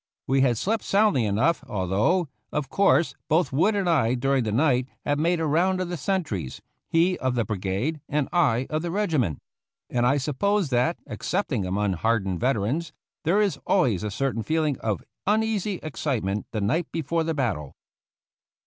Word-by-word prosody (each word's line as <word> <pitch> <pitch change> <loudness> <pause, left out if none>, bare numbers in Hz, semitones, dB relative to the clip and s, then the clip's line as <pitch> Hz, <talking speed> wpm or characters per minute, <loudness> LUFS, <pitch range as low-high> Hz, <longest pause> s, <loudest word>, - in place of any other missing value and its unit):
We 135 +1 +2
had 125 -4 +3
slept 215 - -1
soundly 195 - +3
enough, 130 +12 +1
although, 105 - +1 0.2
of 150 -2 -2
course, 170 -5 +3 0.2
both 155 -4 +2
Wood 195 +10 +3
and 195 -3 0
I 130 -8 +3
during 135 0 +1
the 110 - -1
night 125 +1 +2 0.2
had 145 0 +1
made 170 +2 +2
a 160 - 0
round 180 +5 +2
of 185 -1 -2
the 175 - -2
sentries, 145 - -2 0.3
he 175 +3 +2
of 130 -1 0
the 120 -2 +1
brigade, 105 - -2
and 150 -1 0
I 130 -8 +3
of 155 +1 0
the 170 - -3
regiment; 160 - 0 0.5
and 120 0 +2
I 140 +3 +3
suppose 155 +5 0
that, 125 +7 +2
ex - - -6
cepting 135 - 0
among 100 +1 0
hardened 95 -1 0
veterans, 130 +6 0 0.3
there 190 +7 +3
is 205 -3 0
always 125 - +2
a 105 - -2
certain 130 +2 -1
feeling 155 0 0
of 110 -5 -2 0.2
uneasy 210 -1 +1
excitement 115 -10 -2
the 110 - -2
night 155 - 0
before 165 +1 -1
the 160 0 -2
battle. 100 - -2
140 Hz, 175 wpm, -25 LUFS, 115-170 Hz, 0.5 s, had